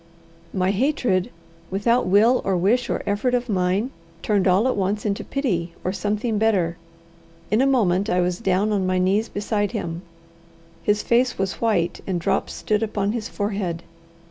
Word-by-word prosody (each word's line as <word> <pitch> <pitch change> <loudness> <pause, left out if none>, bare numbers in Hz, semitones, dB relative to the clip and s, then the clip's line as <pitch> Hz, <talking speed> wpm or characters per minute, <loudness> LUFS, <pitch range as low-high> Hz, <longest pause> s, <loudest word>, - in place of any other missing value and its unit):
My 185 0 +1
hatred, 235 -5 +1 0.4
without 220 +4 +1
will 220 +7 +4
or 190 -2 +1
wish 235 +7 +2
or - - -1
effort 210 +5 +1
of 245 0 -1
mine, 195 +4 0 0.3
turned 200 -3 +2
all 190 +6 +4
at 260 - +1
once 200 +2 -1
into 200 -1 -1
pity 180 -12 -2
or 185 - -1
something 210 +3 -1
better. 190 -7 +2 0.8
In 215 +4 +3
a 270 - +3
moment 205 -6 +2
I 180 - +2
was 180 0 0
down 195 0 +1
on 195 -3 +1
my 185 0 +1
knees 195 +5 +1
beside 205 +1 -1
him. 170 -6 -4 0.8
His 210 0 +1
face 245 +1 +2
was 195 0 -2
white, 190 -7 +1
and 185 -3 -1
drops 190 +3 -1
stood 210 -1 -1
upon 205 -2 -1
his 225 -1 -4
forehead. 195 -5 -3
205 Hz, 170 wpm, -23 LUFS, 185-225 Hz, 0.8 s, will